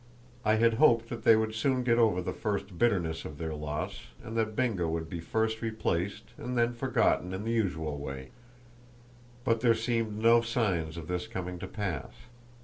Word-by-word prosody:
I 110 0 +4
had 115 +1 +4
hoped 115 -6 +5
that 120 - -5
they 115 - +7
would 110 0 0
soon 130 +3 +1
get 120 -1 +3
over 105 -6 +3
the - - -3
first 100 -4 -3
bitterness 85 -9 +1
of 75 - -8
their 80 0 -3
loss, 75 0 -4 0.2
and 115 - -7
that 110 -1 0
Bingo 105 -10 +1
would 80 0 -2
be 85 +1 -5
first 110 +5 -1
replaced 110 -3 -1 0.2
and 125 +1 -3
then 120 0 +3
forgotten 115 -7 +1
in 95 - -4
the 115 - -1
usual 80 -9 -1
way; 70 -2 -6 1.1
but 115 -3 +1
there 115 -2 +5
seemed 115 -2 -1
no 115 +2 +5
signs 95 -9 -1
of 80 -1 -7
this 90 +3 -2
coming 90 -5 -5
to - - -5
pass. 95 -10 -4
110 Hz, 185 wpm, -30 LUFS, 85-115 Hz, 1.1 s, they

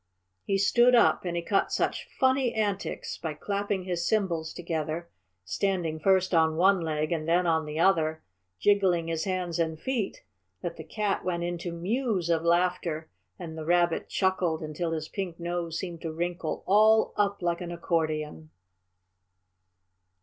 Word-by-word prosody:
He 195 - +1
stood 240 +5 +5
up 235 - +4
and 175 -1 -2
he 170 - -2
cut 195 +3 +1
such - - -1
funny 260 -1 +2
antics 205 -3 -2
by 160 -2 -4
clapping 200 +2 -2
his 175 -2 -2
cymbals 175 -7 0
together, 165 0 -4 0.3
standing 175 - -1
first 190 +1 +3
on 160 -1 +4
one 190 +3 +4
leg 155 -1 -1
and 160 -2 -1
then 175 +2 +3
on 160 -2 +2
the 150 0 -5
other, 160 -3 +2 0.3
jiggling 185 - +2
his 165 -1 -1
hands 180 -3 -2
and 160 -1 -1
feet, 245 -4 -3 0.4
that 170 -1 -3
the - - -8
Cat 210 -2 -2
went 170 -1 -1
into 175 0 -3
mews 185 0 -1
of 165 -1 +2
laughter 170 -2 0 0.3
and 160 -2 -7
the 160 - -5
Rabbit 175 0 +2
chuckled 185 -4 0
until 155 +2 -3
his 155 -1 -3
pink 180 -3 -5
nose 170 -1 -3
seemed 175 -3 -5
to 165 - -4
wrinkle 170 0 -3
all 215 +3 +5
up 200 -2 0
like 170 +1 0
an 175 -1 -5
accordion. 155 - -2
175 Hz, 155 wpm, -28 LUFS, 160-195 Hz, 0.4 s, stood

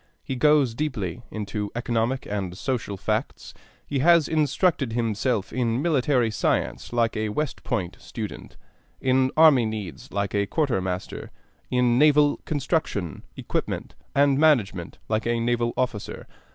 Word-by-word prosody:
He 135 - -4
goes 145 -2 +4
deeply 115 - -3
into 105 -1 -4
economic 120 +1 -1
and 95 -3 -4
social 115 -6 -3
facts; - - -3 0.3
he 140 - -2
has 170 +1 +5
instructed 155 -4 +1
himself 115 -1 -1
in 120 -1 0
military 135 -6 +2
science - - -1
like 115 -1 +1
a 110 0 -1
West 150 +6 -3
Point 95 -7 -2
student, 110 -3 -7 0.4
in 130 0 +2
army 150 -8 +6
needs 100 -10 -6
like 100 -1 -2
a 100 -1 +1
quartermaster, 95 - -2 0.4
in 125 -1 +2
naval 150 -1 +5
construction, 140 - -2 0.2
equipment, - - -3 0.2
and 140 -1 +4
management 110 - +2
like 110 +1 -1
a 120 0 +1
naval 120 0 +1
officer. 125 -5 -3
120 Hz, 130 wpm, -25 LUFS, 105-140 Hz, 0.4 s, army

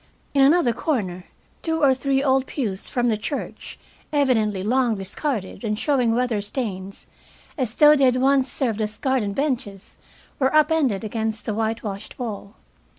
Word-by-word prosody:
In 280 - +3
another 275 -3 +4
corner 195 - -2 0.4
two 320 -1 -1
or 270 -2 +6
three 270 +1 0
old 265 -1 +2
pews 205 -9 -3
from 245 -1 0
the 220 - +1
church, 250 +7 -6 0.3
evidently 225 -9 +1
long 240 +1 +2
discarded 205 +3 -4
and 210 -2 -1
showing 250 -4 +1
weather 240 -4 0
stains, 200 -4 -5 0.5
as 250 -6 -1
though 300 0 +7
they 275 -2 +3
had 250 -1 +4
once 265 0 +2
served 225 -5 -1
as 210 0 -3
garden 255 -7 0
benches, 245 -7 -3 0.4
were 265 +2 +2
up 305 +1 +5
ended 265 -11 +1
against 220 0 -3
the 215 - -2
whitewashed 220 -2 -3
wall. 215 -4 -6
245 Hz, 155 wpm, -23 LUFS, 210-275 Hz, 0.5 s, though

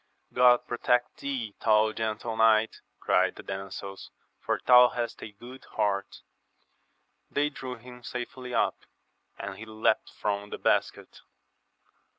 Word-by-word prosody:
God 125 -1 +5
protect 120 0 0
thee, 130 -7 -4
thou 110 -1 +4
gentle 110 +1 -3
knight, 110 0 +3 0.2
cried - - +2
the - - -10
damsels, 95 0 -7 0.3
for - - -1
thou 125 -1 +8
hast 120 -1 -4
a 110 - -7
good 125 +5 -12
heart! 100 -2 -2 1.1
They 145 +1 +1
drew 130 -3 -6
him 125 +1 -13
safely 125 +1 -6
up, - - +1 0.6
and 100 0 -7
he 110 - -8
leapt 110 0 0
from 100 -1 -3
the - - -5
basket. - - -1
115 Hz, 130 wpm, -28 LUFS, 105-125 Hz, 1.1 s, thou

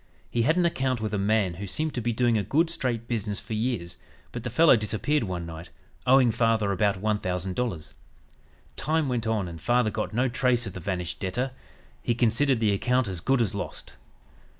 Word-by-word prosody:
He 120 - +1
had 155 +8 +3
an 180 - +3
account 130 -7 0
with 110 -1 -3
a 105 - 0
man 100 -2 +2
who 100 - -4
seemed 155 +9 -1
to 125 - -2
be 120 +1 0
doing 120 0 +2
a 105 - +2
good, 165 - +2
straight 120 -7 -2
business 105 -4 -2
for 115 - -7
years, 110 -6 -2 0.3
but - - -6
the - - -3
fellow 160 -4 +6
disappeared 115 +6 0
one 90 -3 -4
night, 85 +1 -8 0.4
owing 130 -2 +6
father 110 -3 +2
about 100 0 +1
$1000. 95 -2 -2 0.8
Time 155 0 0
went 120 -3 -1
on 110 -4 0
and 85 -2 -8
father 120 +3 +2
got 110 - -3
no 125 +4 +1
trace 125 -1 +1
of 100 - -6
the - - -6
vanished 90 -1 -3
debtor. 120 +8 -2 0.5
He 120 - 0
considered 120 +2 +2
the 110 -3 +2
account 125 +4 +1
as 90 -3 -4
good 135 +2 +2
as 105 -2 -2
lost. 100 - -6
115 Hz, 195 wpm, -26 LUFS, 100-125 Hz, 0.8 s, fellow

